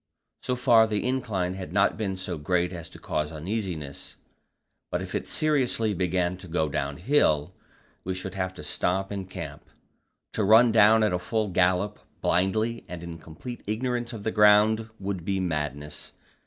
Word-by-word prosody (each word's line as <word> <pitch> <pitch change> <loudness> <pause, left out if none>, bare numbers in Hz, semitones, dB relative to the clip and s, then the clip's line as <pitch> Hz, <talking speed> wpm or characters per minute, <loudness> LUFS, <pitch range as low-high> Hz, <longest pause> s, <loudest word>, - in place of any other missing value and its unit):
So 125 - -1
far 115 -2 +5
the 105 +2 -1
incline 105 -9 -1
had 95 -4 -7
not 100 +1 +3
been 100 -4 -2
so 95 -3 -5
great 90 +3 0
as 85 -2 -7
to - - -11
cause 75 0 -2
uneasiness, 80 -4 -5 0.7
but - - -1
if - - -6
it - - -2
seriously 130 -8 +1
began 90 0 0
to 95 - -12
go 80 -2 0
downhill, 75 - +1 0.5
we 95 0 -3
should 95 0 -5
have 95 -1 -2
to - - -9
stop 95 +6 0
and 95 -2 -5
camp. 80 -6 -7 0.7
To 110 - 0
run 110 +4 +6
down 110 0 +6
at 105 -4 +2
full 110 +2 -1
gallop, 90 +3 +1 0.2
blindly 110 +6 +1
and 90 -1 -7
in 85 -1 -7
complete 85 +11 -9
ignorance 120 +2 -1
of 110 -4 -7
the 110 - 0
ground, 105 +1 +5
would 95 -3 -3
be 95 +2 -1
madness. 75 -4 -4
95 Hz, 165 wpm, -27 LUFS, 85-110 Hz, 0.7 s, run